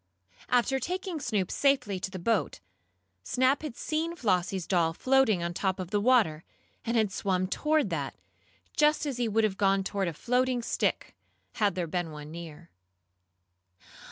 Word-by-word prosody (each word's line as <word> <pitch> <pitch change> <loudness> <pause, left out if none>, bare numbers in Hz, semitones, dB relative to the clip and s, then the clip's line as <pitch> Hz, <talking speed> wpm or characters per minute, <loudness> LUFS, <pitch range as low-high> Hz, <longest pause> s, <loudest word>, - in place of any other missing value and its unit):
After 250 +2 +2
taking 365 +3 -3
Snoop 210 -9 -1
safely 270 -9 +1
to 185 - -4
the 190 - -7
boat, 215 +4 0 0.6
Snap 260 - +2
had 295 -6 -6
seen 325 +2 -2
Flossie's 190 - 0
doll 170 -3 +2
floating 255 -4 +3
on 170 - -2
the 175 - -6
top 190 -1 0
of 185 0 -5
the 205 - +2
water, 210 -10 +3 0.4
and 235 0 0
had 215 -3 +2
swum 185 -1 0
toward 300 +10 +1
that, - - -3 0.6
just 300 0 +3
as 275 -4 -3
he 240 -1 0
would 220 +1 +2
have 200 -3 0
gone 195 -1 +3
toward 195 -1 -1
a 170 - -2
floating 250 +6 0
stick, - - -1 0.4
had 205 -5 +1
there 180 -2 -1
been 175 +1 -2
one 150 -1 -9
near. 170 0 -10
210 Hz, 165 wpm, -29 LUFS, 180-255 Hz, 0.6 s, floating